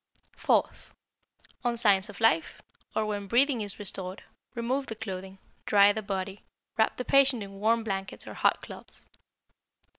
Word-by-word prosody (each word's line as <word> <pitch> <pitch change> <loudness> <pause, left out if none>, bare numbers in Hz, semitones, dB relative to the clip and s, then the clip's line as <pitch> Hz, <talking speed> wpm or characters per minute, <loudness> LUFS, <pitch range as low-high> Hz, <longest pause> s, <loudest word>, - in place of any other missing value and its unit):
Fourth - - 0 0.7
On 240 -1 0
signs 205 -4 +4
of - - -10
life, 165 -9 +2 0.4
or 220 - +1
when 205 -1 -3
breathing 250 +3 +3
is 205 -2 -4
restored, 190 -1 -5 0.3
remove 255 +4 -1
the 220 - -5
clothing, 190 -3 -7 0.3
dry 205 0 +6
the 220 - -3
body, 195 -1 -4 0.3
wrap 220 -1 +1
the 250 - -4
patient 275 -5 +4
in 195 0 -10
warm 225 +2 +2
blankets 195 -3 -4
or - - -8
hot - - +1
cloths. - - -12
210 Hz, 150 wpm, -28 LUFS, 195-230 Hz, 0.7 s, dry